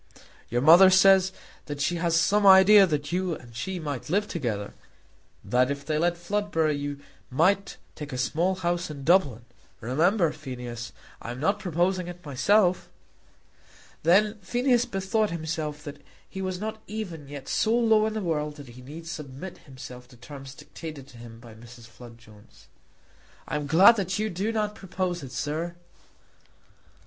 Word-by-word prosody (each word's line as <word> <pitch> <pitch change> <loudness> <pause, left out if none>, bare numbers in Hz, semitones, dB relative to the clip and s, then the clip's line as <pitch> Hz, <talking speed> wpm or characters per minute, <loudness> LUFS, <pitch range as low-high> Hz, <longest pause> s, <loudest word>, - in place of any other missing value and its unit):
"Your 120 +2 0
mother 175 +5 +8
says 190 0 +5 0.4
that 145 -1 -5
she 175 +4 0
has 165 -1 +1
some 205 +4 +2
idea 195 +1 +8
that 150 -2 -2
you 180 -1 -1
and 120 -4 -14
she 180 +10 -4
might 145 -5 -5
live 205 +5 +1
together; 110 - -4 0.7
that 125 +1 +2
if 140 0 -4
they 155 -1 -1
let 175 +1 +1
Floodborough 175 -4 -1
you 145 0 -5 0.3
might 185 +9 +1 0.2
take 150 -1 -8
a 130 - -4
small 165 +9 0
house 175 -1 -2
in 145 -2 -8
Dublin. 140 - +2 0.3
Remember, 165 - +1
Phineas, 120 -3 -7 0.3
I - - -7
am 120 +1 -6
not 200 +8 +1
proposing 180 0 -1
it 175 -1 -10
myself." 180 - +2 1.1
Then 210 +6 +3
Phineas 245 +5 +1
bethought 195 +2 -1
himself 155 -2 -4
that 145 -1 -9 0.3
he 190 - -7
was 185 -1 -3
not 220 +1 -5
even 180 -9 -6
yet 140 -1 -9
so 225 +2 +1
low 220 -2 +3
in 220 - -3
the 215 - -3
world 150 -3 -2
that 145 -4 -12
he 120 +2 -13
need 155 +6 -10
submit 155 +1 -8
himself 125 -3 -11
to 125 -1 -18
terms 135 +2 -11
dictated 150 -4 -10
to 120 -3 -15
him 115 -1 -12
by 115 -1 -13
Mrs. 120 +1 -14
Flood 115 0 -14
Jones. 110 -3 -19 0.8
"I - - -3
am 150 -1 -3
glad 190 +9 +7
that 185 -1 -2
you 215 +1 -1
do 195 +6 -2
not 210 -2 -1
propose 185 -3 -4
it, 130 - -9
sir." 160 +6 -3
165 Hz, 165 wpm, -26 LUFS, 135-190 Hz, 1.1 s, mother